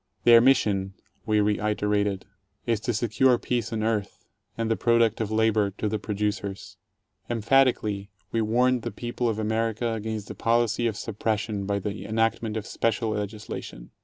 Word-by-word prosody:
Their 115 -1 +8
mission, 100 -7 +2 0.3
we 105 -1 +3
reiterated, 105 -1 0 0.4
is 115 -3 +1
to 115 +2 -2
secure 120 +3 +3
peace 120 -1 -2
on 110 -1 -2
earth, 110 -3 -2 0.3
and 115 -1 -1
the - - +3
product 115 -1 +2
of 110 - -1
labor 110 -2 +2
to 110 - -1
the 105 +1 -1
producers. 100 -1 -3 0.5
Emphatically 115 -4 +2 0.2
we 115 - +1
warned 125 +3 +2
the - - -3
people 120 0 -3
of 110 - -2
America 115 +1 -1
against 110 -1 -4
the - - -6
policy 115 0 +1
of 110 -2 -3
suppression 105 -2 -2
by 100 0 0
the 100 +1 -4
enactment 115 0 0
of 110 - -4
special 115 0 -1
legislation. 105 - -6
110 Hz, 155 wpm, -26 LUFS, 105-115 Hz, 0.5 s, Their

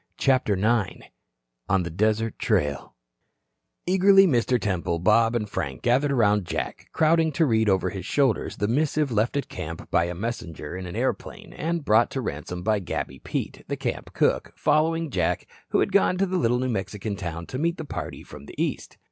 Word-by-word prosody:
CHAPTER 130 -6 +2
IX 110 +1 0 0.6
ON 95 -1 +3
THE 85 - -5
DESERT 110 +4 0
TRAIL 75 -1 0 0.9
Eagerly 195 +2 +6
Mr. 125 - +2
Temple, 90 -5 -1
Bob 115 +6 +3
and 105 -3 -1
Frank 70 -9 -4
gathered 135 +4 +2
around 105 -6 +3
Jack, - - -4
crowding 160 0 +3
to 160 - +3
read 110 -5 +2
over 95 -1 +1
his 95 -3 -6
shoulders 135 +2 0
the 105 - 0
missive 145 +3 +1
left 115 +5 +1
at 140 - -2
camp 80 +1 -7
by 85 - +3
a 85 0 -4
messenger 90 -7 -5
in 90 0 -6
an 85 - -7
airplane - - -3
and 165 -1 -2
brought 110 +2 +4
to 135 - -3
Ransome 90 - -5
by 105 +1 +2
Gabby 65 -7 -4
Pete, - - -4
the - - -3
camp - - -4
cook, - - +1
following 160 +1 +1
Jack, 90 -6 0 0.2
who - - +2
had - - +1
gone 195 -2 +3
to 195 - +2
the 185 0 -1
little 120 -7 +2
New 130 +1 -1
Mexican 100 -1 -3
town 85 -4 -5
to 130 - -5
meet 170 +2 0
the 160 - -6
party - - -6
from 70 - -12
the - - -11
East. - - -3
110 Hz, 190 wpm, -25 LUFS, 95-145 Hz, 0.9 s, Eagerly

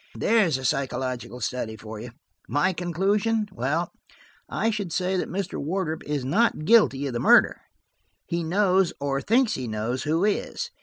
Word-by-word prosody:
There 225 -4 +3
is 150 -5 0
a 130 - -6
psychological 130 -2 -2
study 110 -1 -3
for 110 0 -8
you! 120 +3 -7 0.4
My 145 +10 +1
conclusion? 200 +6 0
Well, 155 +5 -1 0.6
I 225 - 0
should 200 -5 -4
say 185 +2 0
that 180 - -2
Mr. 195 +1 -3
Wardrop 160 0 -2
is 145 -3 -2
not 175 - +1
guilty 210 -11 +4
of 135 - -3
the 120 - -2
murder. - - +5 0.6
He 170 0 -2
knows, 185 +1 +2
or 140 -1 -1
thinks 235 +1 +2
he 130 -2 -4
knows, 110 +4 -2
who 165 +5 +1
is. 470 - -2
165 Hz, 165 wpm, -25 LUFS, 130-200 Hz, 0.6 s, murder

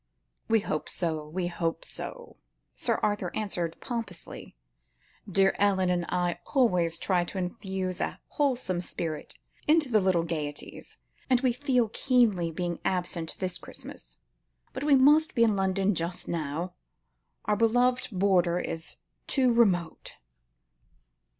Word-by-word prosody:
"We 225 -1 +3
hope 155 -6 -3
so, 160 -3 -1
we 175 +4 -3
hope 165 -1 -2
so," - - -8 0.4
Sir - - 0
Arthur 205 -3 0
answered 175 -6 -2
pompously; 225 - -6 0.8
"dear 195 +1 +4
Ellen 190 -2 +3
and 175 -1 0
I 175 -1 0 0.2
always 180 -10 +3
try 180 0 +1
to 195 - -6
infuse 185 -1 -3
a - - -2
wholesome 250 -11 0
spirit 160 -3 -5 0.3
into 305 -2 +4
all - - -6
the 215 - +5
little 185 -3 +2
gaieties, 150 -3 -5 0.3
and 255 -2 +4
we 255 -3 +2
feel 250 -3 +1
keenly 225 -9 +2
being 170 +1 -3
absent 175 -3 -1
this 185 -2 -2
Christmas. - - -10 0.6
But - - -4
we 295 -2 +6
must 295 +4 +5
be 230 - +5
in 220 -3 +3
London 195 +1 +1
just 170 +1 -3
now. 165 +2 -3 0.7
Our 210 - +2
own 205 - -1
beloved 245 +3 +3
border 180 -3 +3
is 165 -2 -4 0.3
too 255 -3 +3
remote." 185 -8 +1
185 Hz, 135 wpm, -28 LUFS, 170-230 Hz, 0.8 s, we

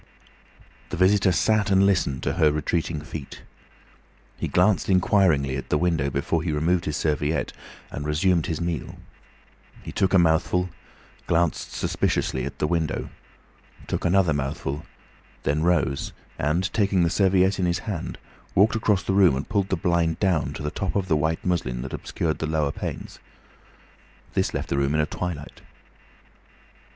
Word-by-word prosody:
The 90 - -4
visitor 95 +1 +4
sat 110 +4 +2
and 95 0 +5
listened 90 -9 +1
to - - 0
her 80 -3 +3
retreating 75 +1 -1
feet. 75 -2 -8 0.9
He - - -3
glanced 90 -2 +2
inquiringly 90 -8 +3
at 65 - -7
the 75 - +2
window 80 -4 +1
before 70 +4 -1
he 80 -1 -2
removed 85 +4 +1
his 75 - -2
serviette, 75 0 -1 0.4
and 75 - -5
resumed 80 +3 +1
his 80 - -2
meal. 85 -2 -3 0.9
He - - -7
took 95 0 +1
a - - +8
mouthful, 85 +2 +2 0.6
glanced 85 -1 0
suspiciously 65 -1 -1
at - - -6
the - - 0
window, 80 -1 -1 0.7
took - - -3
another 90 -2 +3
mouthful, 70 +1 -3 0.6
then 75 +2 +1
rose 80 -5 +1 0.3
and, 85 +6 0
taking 100 -4 +2
the 85 - +1
serviette 95 0 +3
in 90 - +1
his 85 0 -1
hand, 95 -7 -4 0.4
walked 105 +4 +4
across 105 -3 +1
the 95 - -1
room 95 -8 +5
and 70 - -4
pulled 100 -1 0
the - - +1
blind 85 -1 +1
down 95 -6 +1
to - - -7
the 75 - -2
top 95 -3 -3
of 95 -2 -1
the 80 - +4
white 80 +2 -1
muslin 65 -9 -1
that 65 - -7
obscured 80 -3 -2
the 80 - -2
lower 75 -2 0
panes. - - -6 1.1
This - - +1
left - - -4
the 70 - 0
room 70 +2 +1
in 75 - +3
a - - +1
twilight. 80 -2 -6
85 Hz, 160 wpm, -24 LUFS, 75-95 Hz, 1.1 s, a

